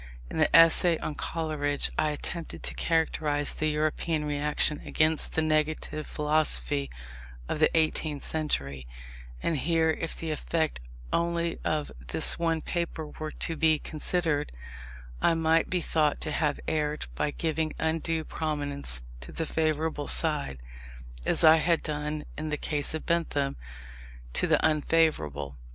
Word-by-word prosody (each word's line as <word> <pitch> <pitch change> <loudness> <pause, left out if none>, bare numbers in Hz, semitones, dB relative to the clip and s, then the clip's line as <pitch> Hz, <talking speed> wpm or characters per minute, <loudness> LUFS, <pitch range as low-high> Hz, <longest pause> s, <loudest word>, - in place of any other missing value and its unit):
In - - -3
the - - +4
essay 165 +1 +6
on 155 - -4
Coleridge 150 -2 -1
I 155 - +1
attempted 160 +3 -5
to - - -3
characterize 155 -3 +1
the 155 - -1
European 155 +1 0
reaction 150 +1 +2
against 155 0 0
the 160 - +1
negative 155 0 -1
philosophy 110 - +1 0.6
of - - -2
the 155 - +5
eighteenth 155 -2 +1
century: 70 - -1 0.6
and 165 - +1
here, 160 +1 +2
if 165 +1 -4
the 165 -1 -3
effect 160 - -1 0.3
only 170 0 0
of 155 -1 -1 0.2
this 65 - +1
one 165 -1 +1
paper 170 -2 -3
were 155 0 -3
to 165 - -2
be 160 0 +3
considered, 155 0 -1 0.7
I 165 - +4
might 160 0 +2
be 180 -1 0
thought 155 -2 +1
to 155 - -3
have 150 -1 0
erred 150 -1 -1
by 65 - -1
giving 160 0 -1
undue 160 0 -1
prominence 145 - -2 0.2
to 60 - -8
the 165 - -3
favourable 155 -1 -1
side, 150 - +2 0.7
as - - +3
I 160 0 +8
had 165 +1 +1
done 150 0 -3 0.2
in 155 0 -3
the 150 - -1
case 150 0 -1
of 160 - -5
Bentham 155 -5 0 0.8
to - - +1
the - - +3
unfavourable. 110 - +1
155 Hz, 140 wpm, -28 LUFS, 150-160 Hz, 0.8 s, I